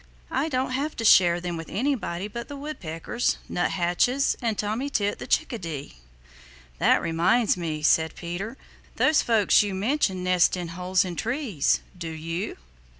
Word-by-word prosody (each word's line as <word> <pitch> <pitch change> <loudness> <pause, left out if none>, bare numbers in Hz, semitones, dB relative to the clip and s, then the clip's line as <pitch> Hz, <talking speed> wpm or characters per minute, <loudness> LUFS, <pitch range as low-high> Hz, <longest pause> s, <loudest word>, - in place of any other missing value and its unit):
I 280 +5 0
don't 255 -2 -1
have 280 +4 -2
to 225 - -3
share 175 -4 +6
them 175 -1 -4
with 165 - -7
anybody 210 -7 -2
but 235 +3 -7
the 285 - -7
Woodpeckers, 240 - -3
Nuthatches, 180 +9 +1
and 225 -3 -1
Tommy 220 +7 -2
Tit 205 -6 -1
the - - -7
Chickadee." 160 - -2 0.8
"That - - +4
reminds 175 +8 +2
me," 160 -4 -4
said 160 +1 +3
Peter. 190 +8 -5 0.4
"Those 305 0 +4
folks 220 -4 +4
you 205 - -1
have - - -3
mentioned 200 -4 0
nest 180 0 +3
in 175 -2 -4
holes 180 +2 0
in 175 -2 -5
trees; 235 - 0
do 170 -2 -6
you?" 165 +4 -4
190 Hz, 155 wpm, -25 LUFS, 170-245 Hz, 0.8 s, share